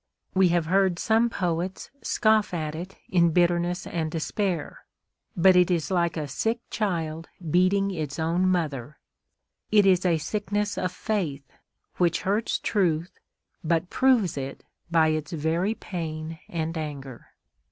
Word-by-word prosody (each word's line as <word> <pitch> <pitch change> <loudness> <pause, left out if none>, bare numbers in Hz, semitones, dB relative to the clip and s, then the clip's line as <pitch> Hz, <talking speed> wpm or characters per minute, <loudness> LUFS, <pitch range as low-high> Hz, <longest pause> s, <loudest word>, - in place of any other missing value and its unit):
We 190 -1 +5
have 170 -1 +1
heard 190 +1 +2
some 225 +4 +2
poets 180 -2 -3
scoff 215 -4 +2
at 155 -2 -3
it 175 +4 -7
in 170 -2 +3
bitterness 175 +1 +1
and 160 -2 -2
despair; 170 +1 -2 0.5
but 185 +2 +6
it 180 0 +5
is 175 0 0
like 170 -3 +1
a 150 -2 -2
sick 225 - -1
child 165 -6 -2 0.2
beating 195 +3 +3
its 155 -5 -4
own 170 +3 +1
mother—it 155 - -2
is 185 -2 +4
a 175 -3 +3
sickness 205 +4 -2
of 185 - -1
faith, 165 -12 -2 0.5
which 175 -2 +2
hurts 205 +4 0
truth, 175 -4 0 0.4
but 165 +2 0
proves 245 - +3
it 135 0 -5 0.3
by 165 -2 +4
its 155 0 -2
very 165 +7 0
pain 160 -4 -5
and 165 -1 -3
anger. 140 -5 -7
175 Hz, 135 wpm, -26 LUFS, 160-190 Hz, 0.5 s, but